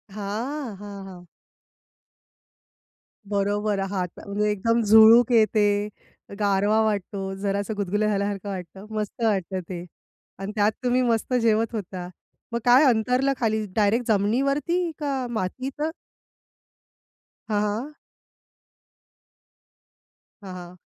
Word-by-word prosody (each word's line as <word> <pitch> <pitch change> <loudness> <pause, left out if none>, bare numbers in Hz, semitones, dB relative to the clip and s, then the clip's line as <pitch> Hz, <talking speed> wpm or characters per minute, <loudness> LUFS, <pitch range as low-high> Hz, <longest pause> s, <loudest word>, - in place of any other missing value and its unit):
हां, 225 +5 -4
हां, 200 -1 -8
हां. 180 -2 -11 2.0
बरोबर 205 0 0
हाता 180 -3 -4
म्हणजे 210 +1 0
एकदम 230 +3 +1
झुळूक 220 +3 +7
येते, 210 -2 +3 0.5
गारवा 205 +2 +2
वाटतो, 200 -2 -2
जरासं 200 +2 -2
गुदगुल्या 205 +2 0
झाल्यासारखं 200 -1 -2
वाटतं, 190 +1 -7
मस्त 210 +2 -4
वाटतं 195 -4 0
ते 175 -1 -5 0.5
आणि 195 +1 -4
त्यात 210 0 +3
तुम्ही 250 0 +2
मस्त 235 0 0
जेवत 225 0 +2
होता. 185 -3 -5 0.4
मग 235 - -1
काय 250 +4 +7
अंतरल 250 +3 +2
खाली 220 -2 0
डायरेक्ट 220 +3 +2
जमिनीवरती 275 - +1
का 275 -3 -2
मातीत? 255 +7 -4 1.7
हां, 210 -1 +1
हां. 225 +8 -3 2.5
हां, 190 -2 -8
हां. 180 0 -10
210 Hz, 105 wpm, -24 LUFS, 200-235 Hz, 2.5 s, झुळूक